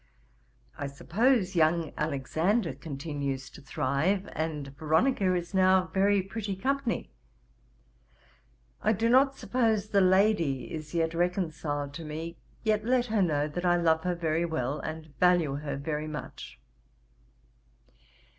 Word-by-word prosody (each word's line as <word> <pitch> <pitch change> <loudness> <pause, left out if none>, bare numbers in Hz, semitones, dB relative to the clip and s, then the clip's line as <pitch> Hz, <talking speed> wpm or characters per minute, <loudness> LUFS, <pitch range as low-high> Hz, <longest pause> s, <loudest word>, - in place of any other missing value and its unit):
I 140 - -2
suppose 195 - +1
young 165 0 +2
Alexander 160 - 0
continues 140 -3 -5
to - - -13
thrive, 150 +9 0
and 150 -3 -4
Veronica 180 - +2
is 175 +1 -4
now 185 -1 +3
very 195 0 +3
pretty 200 0 -4
company. 260 - -1 1.7
I 215 - +3
do 225 +3 +1
not 270 +2 +5
suppose 220 -4 0
the 200 -2 +3
lady 185 -7 +2
is 155 0 -6
yet 165 -1 +1
reconciled 160 -5 -1
to 165 - -7
me, 160 +2 -6 0.2
yet 215 -1 +1
let 245 +1 +2
her 215 - +3
know 150 -5 +1
that 175 +4 -4
I 175 -1 +3
love 160 -2 +2
her 180 -1 0
very 165 -1 0
well, 150 -4 -2
and 155 -1 -7
value 175 -6 +3
her 140 -2 -4
very 150 +2 -3
much. 150 - -8
170 Hz, 130 wpm, -29 LUFS, 150-195 Hz, 1.7 s, not